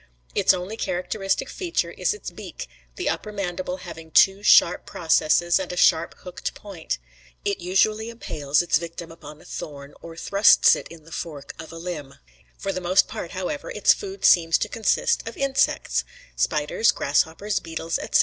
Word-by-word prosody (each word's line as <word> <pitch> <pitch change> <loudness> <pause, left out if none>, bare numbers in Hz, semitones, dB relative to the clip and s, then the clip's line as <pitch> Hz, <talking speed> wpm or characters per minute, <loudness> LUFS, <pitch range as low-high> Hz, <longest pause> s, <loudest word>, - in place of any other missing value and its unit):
Its - - +4
only 185 +4 -3
characteristic 195 +3 -2
feature 350 +3 -2
is - - 0
its 425 - -6
beak, - - -8 0.3
the 365 - -3
upper 215 - -2
mandible 185 -2 -3
having 165 -2 -9
two 195 +4 +5
sharp 180 -4 +5
processes 170 +2 +2
and 185 -2 -4
a 180 - -6
sharp 165 -1 +3
hooked 180 -1 -6
point. 185 - -5 0.5
It 200 - 0
usually 215 +5 +1
impales 150 -10 -1
its 170 - +2
victim 170 0 -8
upon 155 -2 -12
a - - -18
thorn, 140 -1 -8
or 165 -1 -10
thrusts 200 +4 +5
it - - -7
in 165 -2 -13
the 165 - -17
fork 145 -4 -6
of 160 - -9
a 165 - -9
limb. 160 -6 -6 0.4
For 195 - -3
the 185 - -4
most 180 +2 +3
part, 170 - -6
however, 185 +11 -4
its - - +4
food 395 -1 -6
seems 165 -2 +5
to - - -2
consist 225 0 0
of 230 - -7
insects, 275 0 +1 0.3
spiders, 150 +8 +2
grasshoppers, 160 +8 0
beetles, 165 0 -3
etc. - - +2
180 Hz, 170 wpm, -24 LUFS, 165-200 Hz, 0.5 s, two